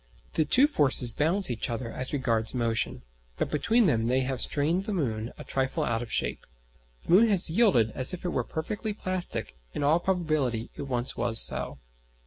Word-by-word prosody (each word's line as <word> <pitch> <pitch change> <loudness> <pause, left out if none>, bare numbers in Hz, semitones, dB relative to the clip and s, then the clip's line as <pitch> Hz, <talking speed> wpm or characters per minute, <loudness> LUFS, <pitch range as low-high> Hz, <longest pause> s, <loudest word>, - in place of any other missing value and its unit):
The 155 - +1
two 255 - +4
forces 135 - +4
balance 170 - +2
each 115 - -3
other 115 0 -4
as 130 0 -4
regards 115 -5 -1
motion, 115 -2 -1 0.3
but - - -2
between 225 - +2
them 115 -10 +1
they 130 +2 +1
have 130 -1 -2
strained 165 +7 +1
the 210 - -3
moon 115 -8 -3
a - - -9
trifle 135 -1 -1
out 115 0 -1
of 120 - -8
shape. - - -2 0.6
The - - -5
moon 210 +6 +6
has 190 -6 +2
yielded 165 - +3
as 130 +2 +1
if 180 -1 -7
it - - 0
were - - -1
perfectly 210 +7 -4
plastic; 185 - -4 0.2
in - - -2
all 155 +4 +3
probability 155 -11 -1
it 140 - -7
once 125 -1 -1
was 115 -1 +2
so. - - +1
140 Hz, 190 wpm, -27 LUFS, 120-180 Hz, 0.6 s, moon